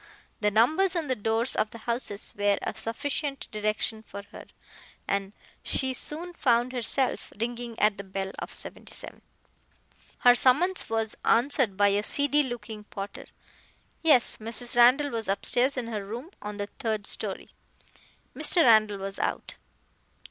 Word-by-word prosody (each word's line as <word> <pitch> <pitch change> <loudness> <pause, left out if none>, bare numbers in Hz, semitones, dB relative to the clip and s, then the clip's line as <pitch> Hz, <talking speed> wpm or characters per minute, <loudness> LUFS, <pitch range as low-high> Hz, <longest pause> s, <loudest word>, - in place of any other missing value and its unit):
The 210 - +2
numbers 310 - +3
on 320 -5 -2
the 255 - +1
doors 225 +3 0
of 215 - +1
the 230 - -10
houses 230 -2 -3
were 205 -1 +2
a - - -2
sufficient 275 +4 -3
direction 215 +1 -1
for 200 -2 -9
her, - - -10 0.6
and 195 0 -1 0.3
she 265 -1 -1
soon 330 +7 -4
found 245 -5 +1
herself 255 +2 -1
ringing 235 0 -4
at 210 -1 +2
the - - -5
bell 195 0 -4
of - - -6
77. - - -5 1.0
Her 245 - +6
summons 300 +10 +3
was 225 -1 -1
answered 240 -4 +3
by 205 0 +5
a 200 +1 +1
seedy 285 +6 +2
looking 225 -5 -6
porter. 200 -1 -8 0.7
Yes, 290 -7 +4
Mrs. 230 +2 -2
Randall 255 +4 +5
was 225 -1 -3
upstairs 250 +7 +2
in 250 - -2
her 215 -3 -4
room 240 - -7
on 210 0 -6
the 205 - -2
third 215 -3 -2
story. - - -3 0.8
Mr. 345 - +5
Randall 215 -4 +5
was 195 0 -5
out. - - -3
230 Hz, 150 wpm, -27 LUFS, 210-260 Hz, 1.0 s, Her